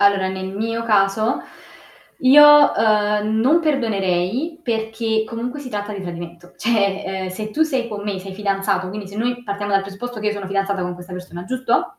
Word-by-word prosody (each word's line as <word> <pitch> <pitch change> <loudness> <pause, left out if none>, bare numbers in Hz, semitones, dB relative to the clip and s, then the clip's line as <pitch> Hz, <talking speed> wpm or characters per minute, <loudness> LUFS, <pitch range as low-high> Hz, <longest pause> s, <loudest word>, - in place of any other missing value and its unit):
Allora, 200 -1 +4
nel 190 0 -4
mio 230 +2 -2
caso 215 0 +2 0.8
io, 295 +2 +8
ehm, 210 0 +2
non 295 +9 +4
perdonerei 230 - 0
perché 225 -2 -1
comunque 240 +5 -5
si 275 - -7
tratta 205 -2 -4
di 200 -2 -6
tradimento, 175 0 -8
cioè, 200 -4 +1
ehm, 190 -1 -3
se 215 +4 -5
tu 315 - +2
sei 265 -6 0
con 210 -3 -6
me, 205 -2 -3
sei 190 0 -8
fidanzato, 195 -2 -1
quindi 205 +1 -6
se 200 +2 -10
noi 245 +2 -1
partiamo 205 0 -4
dal 195 0 +3
presupposto 220 +5 -7
che 210 - -3
io 210 - +2
sono 205 -2 -5
fidanzata 195 -1 -1
con 180 0 -3
questa 180 +1 -11
persona, 180 -1 -8
giusto? 255 +3 -1
210 Hz, 185 wpm, -20 LUFS, 195-230 Hz, 0.8 s, io